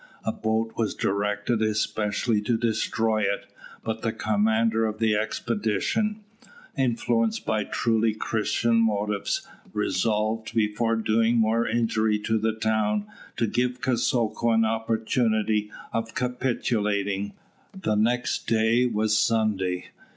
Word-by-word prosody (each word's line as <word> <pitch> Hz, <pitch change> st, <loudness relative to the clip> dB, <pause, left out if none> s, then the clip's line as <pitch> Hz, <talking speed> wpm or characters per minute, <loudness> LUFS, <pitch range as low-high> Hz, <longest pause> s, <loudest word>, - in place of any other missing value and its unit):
A 110 Hz, -, +1 dB
boat 110 Hz, +1 st, -1 dB
was 110 Hz, -2 st, -1 dB
directed 105 Hz, +3 st, 0 dB
especially 110 Hz, 0 st, 0 dB
to 115 Hz, +2 st, +1 dB
destroy 110 Hz, -1 st, 0 dB
it; 100 Hz, 0 st, -1 dB, 0.4 s
but 110 Hz, 0 st, -3 dB
the 115 Hz, -, 0 dB
commander 110 Hz, +1 st, +1 dB
of 110 Hz, 0 st, -4 dB
the 110 Hz, -1 st, +2 dB
expedition, 110 Hz, -, -1 dB, 0.5 s
influenced 120 Hz, -4 st, 0 dB
by 110 Hz, -2 st, 0 dB
truly 115 Hz, -1 st, +1 dB
Christian 115 Hz, +1 st, 0 dB
motives, 105 Hz, -2 st, 0 dB, 0.3 s
resolved, 110 Hz, +3 st, 0 dB
before 115 Hz, +1 st, +1 dB
doing 115 Hz, +1 st, +2 dB
more 115 Hz, +1 st, +2 dB
injury 110 Hz, -1 st, +1 dB
to 110 Hz, +1 st, 0 dB
the 110 Hz, +1 st, 0 dB
town, 110 Hz, -1 st, 0 dB, 0.3 s
to 115 Hz, -, +2 dB
give 125 Hz, +3 st, -1 dB
Kosoko 120 Hz, -3 st, +1 dB
an 115 Hz, 0 st, +4 dB
opportunity 110 Hz, -1 st, 0 dB, 0.2 s
of 115 Hz, 0 st, -3 dB
capitulating. 105 Hz, -6 st, -1 dB, 0.5 s
The 110 Hz, -, 0 dB
next 120 Hz, +4 st, 0 dB
day 115 Hz, +2 st, +3 dB
was 110 Hz, -2 st, +1 dB
Sunday. 105 Hz, -5 st, +1 dB
110 Hz, 115 wpm, -26 LUFS, 105-115 Hz, 0.5 s, an